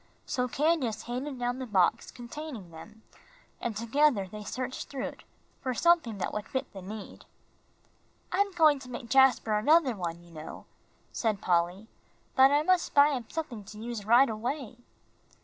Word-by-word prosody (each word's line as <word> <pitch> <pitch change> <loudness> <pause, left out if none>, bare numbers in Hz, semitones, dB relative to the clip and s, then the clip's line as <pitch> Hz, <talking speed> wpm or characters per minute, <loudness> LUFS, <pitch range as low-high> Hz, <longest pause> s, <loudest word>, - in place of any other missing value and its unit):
So 250 0 -1
Candace 270 -5 0
handed 255 +3 -4
down 245 +1 -2
the 260 - -5
box 190 -5 +2
containing 240 - -8
them, 210 +7 -13 0.6
and 230 -3 -3
together 235 -2 +2
they 210 +3 -8
searched 255 +4 -5
through 270 -2 -4
it - - -8 0.4
for 255 -2 -2
something 330 -9 +3
that 190 - -3
would 210 0 -4
fit 260 - -4
the 195 - -8
need. 205 +2 -9 1.1
"I'm 400 +2 +1
going 310 -4 +5
to 260 -1 -11
make 240 -1 -7
Jasper 265 -4 +5
another 290 +1 +4
one, 170 -2 -5
you 170 - -17
know," 155 -1 -9 0.5
said 220 -4 0
Polly, 180 +4 0 0.5
"but 265 -1 +7
I 290 +2 +3
must 365 +1 +1
buy 285 +1 +7
him 250 -5 -3
something 265 -10 -5
to 210 - -11
use 230 -1 -5
right 240 +6 +6
away." 235 +2 -4
240 Hz, 165 wpm, -29 LUFS, 210-280 Hz, 1.1 s, but